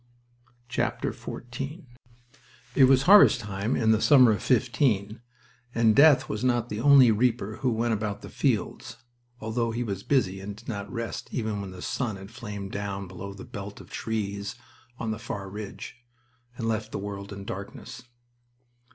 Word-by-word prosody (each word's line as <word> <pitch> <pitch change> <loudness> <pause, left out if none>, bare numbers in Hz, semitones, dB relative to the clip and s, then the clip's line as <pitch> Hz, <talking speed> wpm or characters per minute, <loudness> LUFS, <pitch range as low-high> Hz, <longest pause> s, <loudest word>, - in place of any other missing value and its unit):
XIV 135 +5 -4 0.9
It 135 - +5
was 130 0 +5
harvest 190 -7 +7
time 105 +3 -2
in 110 -2 +3
the 110 0 +3
summer 130 -6 +7
of 105 - -1
'15, 115 -4 +1 0.5
and 115 -2 +4
Death 145 -1 +6
was 105 +2 -4
not 120 -2 +1
the 105 - -4
only 135 -2 +7
reaper 110 -1 0
who 130 - 0
went 115 +1 0
about 105 -1 -3
the - - -8
fields, 115 -10 -1 0.4
although 115 +2 -1
he 115 +2 -2
was 100 -4 -4
busy 95 -9 +1
and 100 +1 -7
did 110 +3 -16
not 100 -3 -5
rest 115 -2 -5
even 110 -4 -2
when 100 - -6
the 90 -1 -9
sun 120 -6 -2
had 95 +2 -11
flamed 105 -5 -7
down 100 -1 -4
below 95 +2 -8
the 100 - -10
belt 105 -5 -8
of - - -14
trees 100 -1 -3 0.4
on 110 -3 -3
the 110 - -4
far 100 -4 -5
ridge, 105 +3 -8 0.6
and 115 - -3
left 110 -1 -2
the - - -3
world 100 0 -6
in 100 -1 -8
darkness. 100 +2 -7
110 Hz, 165 wpm, -27 LUFS, 100-120 Hz, 0.9 s, harvest